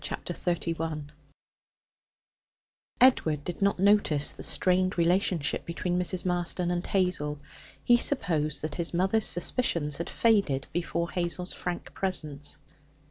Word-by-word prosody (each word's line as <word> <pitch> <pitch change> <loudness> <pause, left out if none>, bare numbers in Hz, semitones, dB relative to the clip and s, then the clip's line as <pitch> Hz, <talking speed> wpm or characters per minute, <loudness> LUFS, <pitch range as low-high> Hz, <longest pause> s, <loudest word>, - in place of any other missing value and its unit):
Chapter 175 - -5
31 165 -4 -3 1.9
Edward 160 - +4
did 175 +3 -6
not 200 0 +2
notice 195 -7 +3
the - - -11
strained 185 0 +1
relationship 175 -2 +1
between 175 +1 -2
Mrs. 180 0 0
Marston 175 0 -1
and 175 0 -1
Hazel. 180 -6 0 0.5
He 240 - +5
supposed 160 - +1
that 155 -1 -3
his 170 +2 -2
mother's 195 +5 +2
suspicions 170 - 0
had 170 - -4
faded 200 - +2
before 170 0 -2
Hazel's 180 +1 -1
frank 175 -1 -5
presence. 150 -7 -3
175 Hz, 120 wpm, -28 LUFS, 160-185 Hz, 1.9 s, He